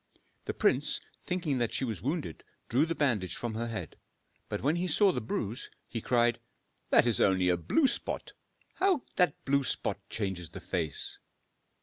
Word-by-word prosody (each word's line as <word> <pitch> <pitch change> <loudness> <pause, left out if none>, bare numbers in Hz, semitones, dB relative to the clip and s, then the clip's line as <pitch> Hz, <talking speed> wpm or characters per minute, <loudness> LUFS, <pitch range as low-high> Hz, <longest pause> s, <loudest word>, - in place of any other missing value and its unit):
The - - -3
prince, - - +2 0.2
thinking 170 -8 -1
that 120 -2 +1
she 135 - 0
was 115 -4 -4
wounded, 145 - -3 0.3
drew 135 +7 +3
the 165 - -1
bandage 115 -11 +1
from 120 -2 -3
her 115 +2 -2
head; 100 -9 -5 0.5
but - - -3
when 150 +5 +2
he 180 +1 0
saw 195 +4 +5
the - - -2
bruise, 110 +1 -3 0.2
he 115 - -4
cried, 120 0 +3 0.5
"That - - +6
is 120 -2 +3
only 95 -2 +4
a 90 - +4
blue 275 - +2
spot! - - -2 0.4
How 370 -7 +3
that 180 -6 +4
blue 140 0 +3
spot - - -1
changes 95 -6 -3
the - - -8
face!" 80 -5 -2
120 Hz, 175 wpm, -31 LUFS, 100-160 Hz, 0.5 s, That